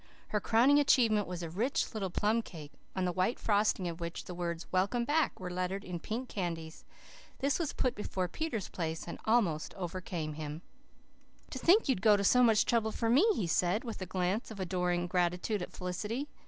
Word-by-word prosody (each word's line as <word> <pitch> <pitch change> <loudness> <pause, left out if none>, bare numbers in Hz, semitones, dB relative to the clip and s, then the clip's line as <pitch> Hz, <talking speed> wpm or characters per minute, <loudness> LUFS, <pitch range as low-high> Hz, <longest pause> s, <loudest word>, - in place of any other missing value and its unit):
Her 210 - +1
crowning 250 +9 +5
achievement 225 -7 +4
was 180 -1 -5
a 165 - -4
rich 230 - -1
little 200 -4 -2
plum 215 +5 +1
cake, 155 -8 -10 0.2
on 185 -1 0
the 180 - +1
white 185 +6 0
frosting 205 -3 +1
of 170 0 -5
which 170 0 -5
the 180 - -7
words 170 -1 -3
"Welcome 200 +6 +1
Back" 305 +4 +1
were 180 -1 -5
lettered 185 +2 -2
in 180 -3 -5
pink 235 +8 -4
candies. 165 -6 -5 0.5
This 280 +4 0
was 320 -4 -1
put 255 - 0
before 185 -3 -3
Peter's 230 - -3
place, 160 -1 -4
and 170 - -6
almost 205 -9 +1
overcame 175 -3 -4
him. 155 +1 -6 0.9
"To 260 - -5
think 360 - +6
that - - -6
you'd 245 -8 +2
go 215 -2 +6
to 200 - -1
so 250 +5 +5
much 225 -3 +5
trouble 225 -2 +1
for 230 0 0
me!" 295 - +5
he 195 - -1
said, 180 - +1
with 230 -5 -6
a 185 - -4
glance 185 +5 -1
of 220 -3 -9
adoring 180 -1 0
gratitude 180 +3 0
at 180 - -5
Felicity. 210 +9 -4
190 Hz, 200 wpm, -32 LUFS, 175-230 Hz, 0.9 s, think